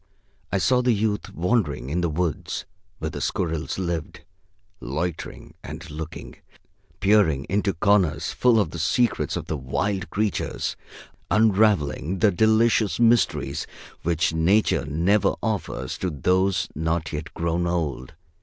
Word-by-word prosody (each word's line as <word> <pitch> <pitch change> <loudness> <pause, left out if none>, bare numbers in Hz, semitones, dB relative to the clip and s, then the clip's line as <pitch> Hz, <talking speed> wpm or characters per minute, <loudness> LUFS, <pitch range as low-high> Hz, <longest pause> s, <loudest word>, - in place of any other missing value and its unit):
I 100 - +1
saw 125 +6 +3
the 125 -1 +3
youth 105 0 -1
wandering 85 - 0
in 90 +3 0
the 85 - +1
woods 80 -1 -2 0.3
where 80 0 -4
the - - -6
squirrels 80 -3 -2
lived, 85 -4 -3 0.6
loitering 80 +7 -5
and 80 +4 -8
looking, 80 +1 -7 0.6
peering 95 -9 +3
into 100 0 0
corners 95 -2 +2
full 120 -3 +3
of 95 -7 0
the 85 - -6
secrets 115 +8 +1
of - - -5
the 80 - -3
wild 95 +9 -2
creatures, 105 -1 -2 0.5
unraveling 100 -7 +2
the 100 +2 +4
delicious 110 +2 +3
mysteries 120 0 +2 0.3
which 85 -1 +1
Nature 90 +7 +2 0.2
ever 105 +1 +3
offers 100 - -3
to 95 - -1
those 90 +6 +1
not 80 +1 -2
yet 75 +2 -5
grown 85 +1 0
old. 80 -5 -2
90 Hz, 130 wpm, -24 LUFS, 80-105 Hz, 0.6 s, the